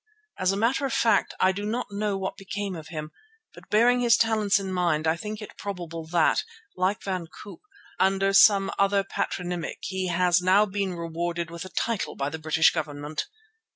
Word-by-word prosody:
As 185 0 +2
a 195 - -2
matter 235 +6 +1
of - - -4
fact 225 -3 +2
I 185 - +4
do 200 +2 -5
not 220 +1 -3
know 205 -1 -1
what 190 0 -4
became 195 0 -5
of 160 -2 -9
him, 155 -2 -6 0.4
but - - -15
bearing 240 +4 +4
his 240 -2 +4
talents 215 -3 +2
in 190 -1 -4
mind 170 -4 +1
I 160 - +3
think 210 +4 -6
it - - -11
probable 170 -5 -6
that, 165 -1 +2 0.3
like 185 +3 0
Van 185 -4 -3
Koop, 200 +4 -12 0.4
under 195 +1 +2
some 195 -1 +6
other 200 0 +3
patronymic 180 -2 -3
he 190 -1 -3
has 180 0 +2
now 190 +3 +4
been 195 -2 -2
rewarded 170 0 -3
with 170 +1 -7
a - - -8
title 220 +4 -2
by 140 +1 -2
the 160 +2 -6
British 160 +1 +3
Government. 150 - -4
190 Hz, 190 wpm, -26 LUFS, 170-205 Hz, 0.4 s, some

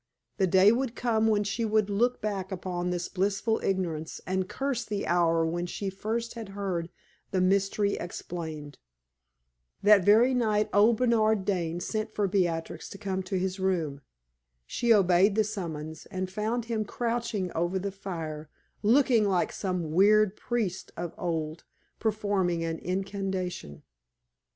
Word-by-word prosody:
The 190 - +3
day 190 +3 +6
would 250 0 -1
come 225 -2 +1
when 210 -1 +3
she 205 +3 -2
would 215 -2 +2
look 235 +5 +1
back 200 -2 -2
upon 180 -1 -3
this 175 -1 -2
blissful 200 +3 0
ignorance 170 -5 -2
and 185 0 -1
curse 270 -3 -2
the 205 -1 -3
hour 165 -1 +3
when 175 +2 -2
first 215 +5 -3
she 235 - -8
had 220 -3 -7
heard 180 -4 -2 0.4
the 190 - 0
mystery 195 +2 +2
explained. 160 -4 -6 1.0
That 205 -2 +7
very 225 +7 +5
night 215 -4 +1
old 215 +3 +5
Bernard 220 -4 +2
Dane 175 -4 -1
sent 215 +2 -2
for 205 -1 +1
Beatrix 175 -4 -1
to - - -9
come 190 -1 -2
to 185 +1 -3
his 185 +1 -2
room. 165 -7 -1 0.6
She 235 - 0
obeyed 195 -1 +5
the 220 - +4
summons, 160 -7 -5
and 185 -1 -4
found 220 +4 -1
him 225 -2 -1
crouching 230 -4 -2
over 175 +3 0
the 195 +1 -3
fire, 160 -6 -6 0.3
looking 230 -2 +4
like 180 -2 +1
some 180 -5 -3
weird 205 +3 +4
priest 215 -7 -3
of 175 -1 -4
old 160 -2 -3 0.4
performing 200 -6 0
an 165 0 -3
incantation. 185 - -3
195 Hz, 145 wpm, -28 LUFS, 175-215 Hz, 1.0 s, That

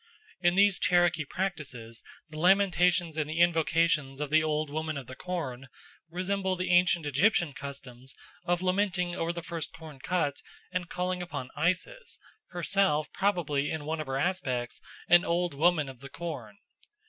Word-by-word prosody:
In 175 -1 +3
these 200 0 +5
Cherokee 175 -3 +3
practices 140 -11 -4 0.3
the 155 -1 -8
lamentations 180 -2 +3
and 150 -1 -1
the 160 +2 -3
invocations 165 -4 +2
of 150 -1 -3
the 155 0 +5
Old 155 -1 -1
Woman 155 0 -2
of 135 - -6
the 130 - -9
Corn 135 -8 -5 0.4
resemble 190 +2 -1
the 180 0 -2
ancient 175 -2 +4
Egyptian 165 +2 +2
customs 135 -2 -8 0.3
of 175 0 0
lamenting 185 -2 +1
over 165 -1 -1
the 170 -1 -6
first 165 -3 -4
corn 155 -4 -11
cut 150 -2 -1 0.3
and 180 -1 -3
calling 180 0 -2
upon 150 -7 -6
Isis, 185 - -1 0.3
herself 175 -3 +1
probably 165 -8 0
in 155 -2 -4
one 160 +1 -2
of 155 - -7
her 135 0 -2
aspects 135 -7 -2 0.3
an 175 0 +7
Old 175 0 0
Woman 155 0 +3
of 130 -2 -10
the 140 +2 -10
Corn. 135 -12 -7
165 Hz, 160 wpm, -29 LUFS, 145-180 Hz, 0.4 s, an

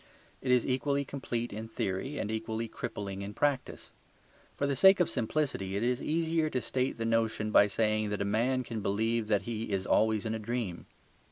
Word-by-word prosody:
It 130 - 0
is 125 -1 +4
equally 140 +2 0
complete 120 -4 -4
in 110 +2 -5
theory 110 +6 -3
and 105 - -2
equally 110 +1 -3
crippling 100 -3 -5
in 100 +1 -6
practice. 140 -3 -1 0.7
For 140 - 0
the 140 -1 0
sake 190 +8 +7
of 175 - +4
simplicity, 115 -6 -1
it 105 - -1
is 125 +1 +1
easier 160 0 +1
to 130 - -1
state 130 +1 -1
the 115 - -2
notion 115 -1 +1
by 100 - +7
saying 110 +1 +1
that 105 - -2
a - - -3
man 120 +5 +1
can 115 -2 -5
believe 110 +3 0
that 105 -2 +2
he 115 0 -4
is 95 -1 -1
always 110 0 +2
in 110 - -1
a 110 - -2
dream. 110 -5 -4
115 Hz, 195 wpm, -31 LUFS, 105-130 Hz, 0.7 s, sake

